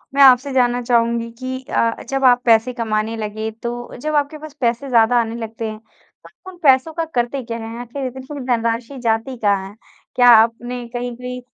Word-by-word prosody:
मैं 280 - +4
आपसे 265 +1 +6
जानना 245 -1 +2
चाहुँगी 235 -1 +1
कि 260 0 -4
अ, 230 0 0
जब 270 0 -1
आप 245 -1 +5
पैसे 230 +2 +4
कमाने 225 -1 -2
लगे 215 +1 -4
तो 240 0 -5
जब 305 +2 -2
आपके 290 +1 0
पास 310 -1 -10
पैसे 240 +3 0
ज़्यादा 235 0 +4
आने 225 0 -4
लगते 225 -1 -5
हैं, 215 - -8
तो 225 +10 -19
उन 360 - -16
पैसों 270 +3 +4
का 330 0 -2
करते 245 +2 -1
क्या 230 0 -5
हैं? 225 0 -7
आखिर 260 +3 -6
इतनी 265 +3 -8
धनराशि 235 +2 -1
जाती 230 +3 -1
कहाँ 200 -3 0
है? 205 - -15 0.4
क्या 245 -1 +6
आपने 235 +2 +3
कहीं 245 0 -4
कोई 250 0 -6
240 Hz, 195 wpm, -19 LUFS, 230-260 Hz, 0.4 s, आपसे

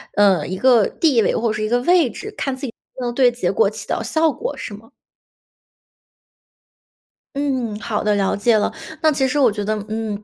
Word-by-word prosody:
嗯 195 -7 +3
一 185 - -3
个 240 -2 +4
地 280 -8 +2
位 - - +1
或 235 - 0
者 - - -1
是 215 0 -3
一 215 - -1
个 245 +1 +2
位 340 -1 +3
置， 420 - -8
看 270 -2 -2
自 265 +2 -6
己 235 - -6 0.3
能 240 -1 -2
对 250 -1 +4
结 235 -7 -1
果 195 - +2
起 210 0 -9
到 - - -1
效 315 +7 +1
果 485 - -5
是 - - -7
吗？ 220 +3 -13 2.5
嗯， 260 -7 -2
好 215 -1 -3
的， 210 0 +2
了 195 -1 +1
解 220 +2 +3
了。 210 - 0 0.3
那 315 - +4
其 270 -2 +1
实 265 - -2
我 260 -6 +4
觉 205 0 -4
得， 215 +2 -1
嗯， 215 -1 -4
230 Hz, 225 characters per minute, -20 LUFS, 210-265 Hz, 2.5 s, 个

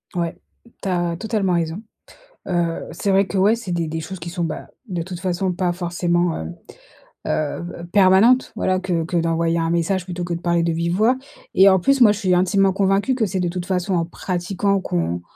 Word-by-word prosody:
Ouais, 170 -1 -1 0.5
tu 195 - -3
as 175 -2 0
totalement 210 -2 -1
raison. 170 +2 -1 0.7
Heu, 170 -1 -1
c'est 195 +4 -1
vrai 195 +1 +4
que, 195 - -3
ouais, 205 +4 +4
c'est 230 -6 -6
des 170 -2 -1
des 160 +1 -3
choses 185 +4 -7
qui 170 +1 -6
sont, 175 0 -3
bah, 160 -2 -4 0.2
de 180 -3 -3
toute 180 0 -7
façon, 185 0 -1
pas 175 0 0
forcément, 175 -1 0
hem, 80 +2 -6 0.7
heu - - +1 0.5
heu, 170 - -7
permanentes. 205 +7 +5
Voilà 185 0 0
que 180 -3 -1
que 175 +1 -2
d'envoyer 165 0 +1
un 165 - 0
message 170 +2 0
plutôt 180 -1 -5
que 175 0 -3
de 170 - -4
parler 170 -1 +1
de 170 - +1
vive 170 +1 -1
voix 230 +5 +3 0.4
et 195 +1 +7
en 190 -1 +4
plus, 275 +8 +2
moi 215 -4 +8
je 205 - -2
suis 185 -4 +1
intimement 190 +1 +3
convaincue 195 +6 +1
que 235 -3 +1
c'est 190 -1 -2
de 180 - 0
toute 175 0 -4
façon 185 0 -1
en 170 - +1
pratiquant 185 +3 -1
qu'on, 85 - -2
180 Hz, 215 wpm, -21 LUFS, 170-195 Hz, 0.7 s, moi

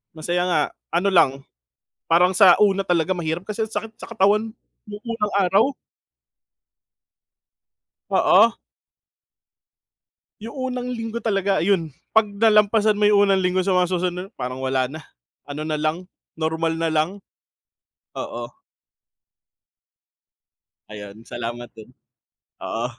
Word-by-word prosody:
Masaya 175 +3 -1
nga. 165 -4 +2 0.3
Ano 195 +3 +2
lang, 140 -7 +3 0.6
parang 180 +2 +3
sa 190 -3 +8
una 195 -1 +3
talaga 175 0 0
mahirap 170 +2 -4
kasi 215 +1 -2
ang 220 - -12
sakit 225 0 -5
sa - - -11
katawan 215 +1 +2 0.3
yung 205 0 -9
unang 210 -3 -2
araw. 190 +1 +3 2.5
Oo. 225 +4 +4 1.9
Yung 230 +5 -8 0.2
unang 250 0 -4
linggo 230 -1 -5
talaga 195 -4 0
ayun, 170 -7 0 0.2
'pag 220 -1 +4
nalampasan 210 0 +3
mo 210 - +4
yung 205 -1 +4
unang 195 - +3
linggo 185 0 +1
sa 195 - 0
mga 180 -1 +3
susunod 180 0 -2
parang 125 +1 -5
wala 130 -1 0
na. 160 - -7 0.5
Ano 145 +2 -5
na 155 -1 -2
lang, 160 +4 -2 0.3
normal 160 +1 -1
na 165 0 -1
lang. 170 +6 -1 0.9
Oo. 120 +1 -6 2.4
Ayun. 105 +1 -10
Salamat 120 0 -6
din. 110 +1 -14 0.7
Oo. 115 +2 -3
180 Hz, 120 wpm, -22 LUFS, 155-205 Hz, 2.5 s, sa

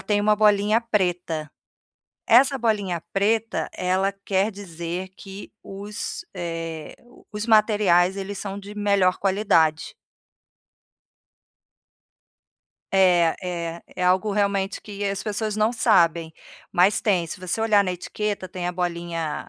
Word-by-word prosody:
tem 205 -1 0
uma 210 +1 +3
bolinha 210 +1 +3
preta. 175 -8 -1 0.8
Essa 265 +4 +5
bolinha 205 -7 -1
preta, 220 +3 0
ela 185 +2 0
quer 195 +2 +1
dizer 180 -2 -6
que 195 0 -10
os, 205 +10 -6
eh, 165 -3 -5 0.4
os 210 +1 -4
materiais, 205 -5 +4
eles 195 0 -5
são 200 -1 -5
de 200 +1 -10
melhor 200 -3 +2
qualidade. 185 -6 +1 3.0
É, 180 -4 +4
é, 170 -2 -5
é 180 - -4
algo 185 +3 +2
realmente 200 -1 0
que 205 -1 -6
as 200 0 -2
pessoas 215 0 -2
não 215 +2 +1
sabem, 170 -8 +2 0.4
mas 185 +4 +3
tem, 190 -7 +1
se 160 - -7
você 185 +4 -3
olhar 210 -3 +4
na 185 - -1
etiqueta, 195 +1 -4
tem 180 -1 -5
a 180 - -2
bolinha, 170 -3 -3
195 Hz, 125 wpm, -23 LUFS, 175-210 Hz, 3.0 s, Essa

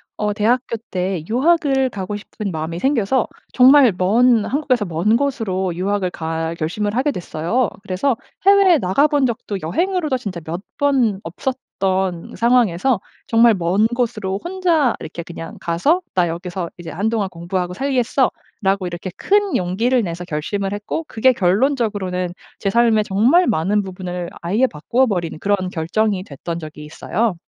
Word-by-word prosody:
어 210 0 -1
대학교 230 +3 0
때 180 -3 -2
유학을 270 0 +2
가고 200 -1 -5
싶은 205 -1 -6
마음이 160 +1 -4
생겨서 250 +1 +1 0.2
정말 260 -1 +7
먼 225 +4 +4
한국에서 260 -6 0
먼 180 +6 +2
곳으로 210 -10 -1
유학을 190 0 -1
갈 160 0 -3
결심을 205 +7 -2
하게 270 +4 +1
됐어요. 180 - -1
그래서 205 +6 0 0.3
해외에 395 -3 +6
나가본 285 +7 +2
적도 220 -4 -3
여행으로도 320 - 0
진짜 195 -7 -5
몇 170 +4 -4 0.2
번 255 -8 +2
없었던 190 -2 -3
상황에서 235 -2 +2 0.3
정말 230 -1 +5
먼 185 +4 +2
곳으로 225 -5 -2
혼자 345 -8 +1
이렇게 170 +1 -7
그냥 165 -1 -8
가서 230 - +1
'나 180 -2 +2
여기서 175 +1 -4
이제 170 -2 -8
한동안 210 +2 -1
공부하고 180 +1 -3
살겠어.'라고 240 -5 -1
이렇게 175 +2 -5
큰 410 -1 +2
용기를 225 +8 +1
내서 175 -1 -5
결심을 195 +5 -3
했고 210 +10 -4
그게 255 +4 +3
결론적으로는 195 -4 0 0.3
제 200 - 0
삶의 225 0 +3
정말 245 - +4
많은 190 +7 +1
부분을 180 -2 -5
아예 210 +10 +2
바꾸어 240 - 0
버린 175 -7 -2
그런 195 -1 0
결정이 185 +4 0
됐던 165 +1 -6
적이 155 -1 -9
있어요. 200 +7 -1
205 Hz, 330 characters per minute, -20 LUFS, 180-250 Hz, 0.3 s, 정말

